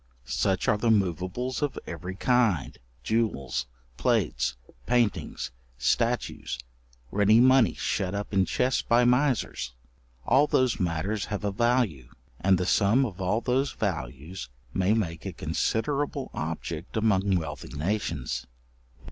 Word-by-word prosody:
Such 65 +9 0
are 105 - +3
the 115 +1 +1
moveables 100 - 0
of 145 -1 -1
every 90 +2 -6
kind; 110 - +2 0.3
jewels, 105 - -1 0.3
plates, 60 0 +1 0.3
paintings, 120 -4 0 0.3
statues, - - 0 0.5
ready 105 +2 +5
money 130 -5 +5
shut 95 +1 -1
up 100 +1 -4
in 95 -1 +4
chests 125 +6 +1
by 120 +1 +3
misers: 125 - +1 0.5
all 145 +3 +4
those 130 -4 +2
matters 90 +4 -1
have 105 -1 -4
a 100 - 0
value, 110 - +1 0.3
and 95 0 +4
the 90 - -1
sum 110 +8 +3
of 100 -5 -6
all 100 +5 +1
those 130 +3 0
values 80 - -4 0.2
may 95 +3 +2
make 85 -7 -2
a 95 - -4
considerable 135 - -1
object 80 +3 -4
among 100 -3 +2
wealthy 80 -4 -4
nations. 90 - -2
100 Hz, 125 wpm, -27 LUFS, 85-120 Hz, 0.5 s, ready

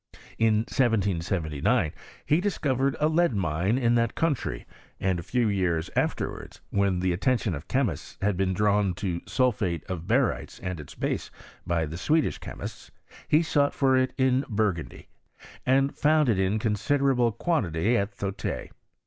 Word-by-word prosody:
In 110 -1 +4
1779 95 - +1 0.3
he 155 +4 +3
discovered 140 -9 0
a 150 - +3
lead 160 -5 +2
mine 95 +4 0
in 120 -2 +2
that 115 -1 +1
country, 140 - -1 0.3
and 95 -2 0
a - - -4
few 120 +6 0
years 90 -5 0
afterwards, - - -2
when 100 -2 +1
the 90 -1 +1
atten 125 +8 +2
tion 105 -5 -2
of 75 +1 -7
chemists 125 - -1
had 100 0 +1
been 95 +1 0
drawn 100 -1 +2
to 90 -3 -3
sulphate 100 - 0
of 90 -4 -6
barytes - - 0
and 90 -2 -3
its 75 - -10
base, - - -2 0.4
by 85 -2 +1
the 80 +3 -6
Swedish 155 +9 +1
chemists, - - -8 0.4
he 155 +3 +4
sought 145 -3 +1
for 135 -2 +3
it 130 0 +2
in 130 0 +3
Burgundy, 100 -7 -2 0.6
and 135 +2 +3
found 150 -2 +3
it 105 -4 +2
inconsi 105 +7 +1
derable 125 -5 +2
quantity 110 - +1
at 100 -3 +1
Thote. 95 -9 -4
105 Hz, 155 wpm, -27 LUFS, 90-130 Hz, 0.6 s, In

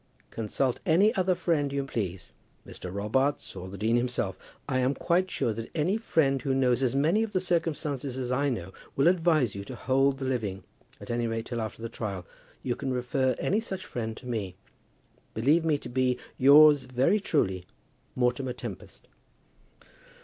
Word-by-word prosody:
Consult 120 +3 -1
any 195 +7 +4
other 185 -1 +2
friend 150 -5 0
you 140 0 -1
please; 95 -9 -4 0.3
Mr. 90 - -8
Robarts, 120 +9 -1
or 95 - -7
the 100 - -8
dean 110 +4 +2
himself. 125 0 -1 0.3
I 130 - 0
am 130 +2 +1
quite 180 +2 +1
sure 115 - -1
that 115 +1 -6
any 170 +5 +1
friend 140 - +1
who 135 -2 0
knows 130 -1 +2
as 130 -1 +1
many 160 +10 +3
of 225 -2 -2
the 185 - +2
circumstances 150 -7 -1
as 125 -1 -3
I 140 +3 +1
know 95 -7 -4 0.2
will 140 +4 +3
advise 160 - +3
you 100 - -6
to 130 - -7
hold 135 +2 +2
the 135 - -4
living, 105 -8 -2 0.4
at - - -7
any 120 0 0
rate 115 0 -3
till 120 -2 -3
after 110 +1 -6
the - - -2
trial. 100 -6 -5 0.4
You 125 -2 -1
can 135 - -3
refer 130 +1 0
any 205 - +1
such 190 -4 -5
friend 115 - -4
to - - -12
me. 105 -7 -3 0.8
Believe 145 +10 +3
me 155 -2 +2
to - - -9
be, 125 0 +1 0.2
yours 145 +1 +7
very 130 +11 +2
truly, 95 - 0 0.5
MORTIMER 125 +1 0
TEMPEST. - - -9
130 Hz, 180 wpm, -28 LUFS, 115-150 Hz, 0.8 s, yours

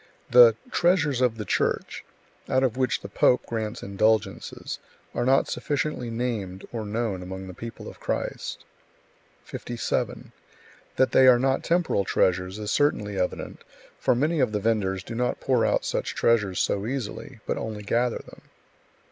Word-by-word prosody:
The 120 -2 +8 0.2
"treasures 160 - +2
of 120 -3 +2
the 105 - -4
Church," - - -1 0.5
out 130 - +3
of 125 -4 +1
which 130 0 0
the - - -7
pope. 125 - +3
grants 110 -2 -4
indulgences, 110 +2 0 0.3
are - - -1
not 135 +1 +4
sufficiently 145 -4 -2
named 115 -6 -3
or 110 -3 -4
known 110 -3 -2
among 95 +1 -7
the 95 - -8
people 115 +5 -8
of - - -10
Christ. - - -4 0.8
57. 120 -2 -3 0.6
That 130 - +3
they 130 - +6
are 125 -1 +8
not 135 +2 +1
temporal 170 - +1
treasures 90 +1 +1
is 105 -1 -3
certainly 105 -9 +1
evident, 90 - -3 0.4
for - - +2
many 155 +6 +1
of 125 -5 +2
the 105 - +1
vendors 100 -4 0
do 115 - -7
not 125 +2 -1
pour - - +2
out - - +1
such - - -2
treasures 105 -6 +2
so 100 +2 0
easily, 130 0 -5
but - - -2
only 105 -2 -5
gather 120 +3 +1
them. - - -14
115 Hz, 155 wpm, -26 LUFS, 105-130 Hz, 0.8 s, The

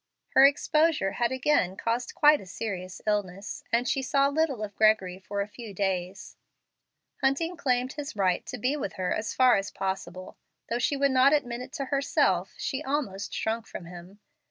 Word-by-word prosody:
Her 275 - +7
exposure 305 -5 +2
had 240 +3 0
again 255 -8 +1
caused 235 +2 -2
quite 300 0 +5
a 190 - -12
serious 185 -1 -6
illness, 205 -1 -2
and 240 +2 +2
she 270 - +1
saw 275 +1 +2
little 285 -6 0
of 205 -2 -6
Gregory 205 -4 +3
for 200 +2 -4
a 200 - -3
few 210 -1 -10
days. 190 -1 -3 0.8
Hunting 275 +6 +1
claimed 255 -6 0
his 295 -5 -6
right 185 -3 +1
to 250 - -5
be 255 +6 0
with 270 -10 -4
her 185 -1 -1
as 215 - -3
far 255 -3 +5
as 195 0 -2
it - - -11
was - - -21
possible. 185 -1 -4 0.3
Though 235 - -1
she 280 +3 0
would 280 0 +2
not 260 +2 +5
admit 250 -5 0
it 255 +1 -9
to 275 - -3
herself, 195 - +1
she 270 +3 -3
almost 260 -9 -3
shrunk 225 +1 -2
from 175 - -8
him. 180 +3 -12
230 Hz, 190 wpm, -27 LUFS, 195-275 Hz, 0.8 s, Her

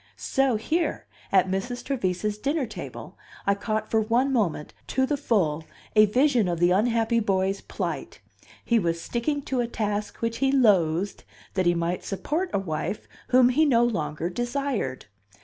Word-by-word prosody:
So 270 -3 +1
here, 315 +11 -1 0.3
at 190 -1 +4
Mrs. 195 +7 -3
Trevise's 210 -5 -1
dinner 285 +3 0
table, 225 - -9 0.3
I 200 - +4
caught 215 +1 -3
for 220 - +3
one 240 +5 +1
moment, 180 -11 -1
to 265 - +1
the 290 - 0
full, 185 - 0 0.3
a 215 0 +7
vision 250 -1 +3
of 170 -2 -1
the 175 +1 +4
unhappy 230 +3 +2
boy's 195 -2 0
plight; - - -5 0.5
he 235 -1 +3
was 170 -3 -1
sticking 275 - -2
to 265 -2 -2
a 235 - -1
task 210 -2 -2
which 230 0 -2
he 270 -1 +2
loathed 195 -8 +2 0.3
that 185 -2 +1
he 175 - +4
might 170 +1 -1
support 310 - -2
a - - +1
wife 190 +2 -3 0.2
whom 250 -1 +5
he 285 +5 +3
no 245 -6 +4
longer 160 -8 -1
desired. 240 - -2
215 Hz, 165 wpm, -26 LUFS, 185-255 Hz, 0.5 s, a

